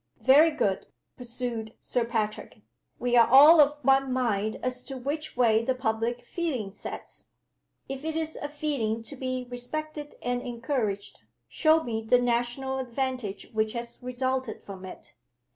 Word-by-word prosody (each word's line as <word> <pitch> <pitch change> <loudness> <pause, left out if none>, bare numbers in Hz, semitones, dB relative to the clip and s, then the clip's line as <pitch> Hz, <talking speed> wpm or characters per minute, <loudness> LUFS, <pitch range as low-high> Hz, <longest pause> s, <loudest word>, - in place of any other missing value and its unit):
"Very 290 +5 +6
good," 200 -11 -1 0.3
pursued 235 -2 -5
Sir 245 - 0
Patrick. 220 -2 -3 0.3
"We 245 0 0
are 235 -1 +7
all 300 +5 +9
of 295 +1 +3
one 270 0 +4
mind 220 -4 0
as 250 0 -2
to 270 - -5
which 290 +3 -4
way 225 -2 +4
the 260 +2 0
public 230 0 -1
feeling 255 - -3
sets. - - -8 0.5
If 270 +1 -6
it 320 0 -2
is 320 -1 -1
a 290 - -5
feeling 275 -7 -2
to 280 - -7
be 255 -1 -3
respected 295 +5 -5
and 245 0 -1
encouraged, 235 -5 -3 0.3
show 320 0 +3
me 225 -2 -3
the 225 +3 +4
national 245 +2 0
advantage 255 -5 -3
which 220 0 0
has 235 -1 -5
resulted 255 -1 -2
from 190 -2 -9
it. 185 - -11
250 Hz, 150 wpm, -27 LUFS, 230-270 Hz, 0.5 s, all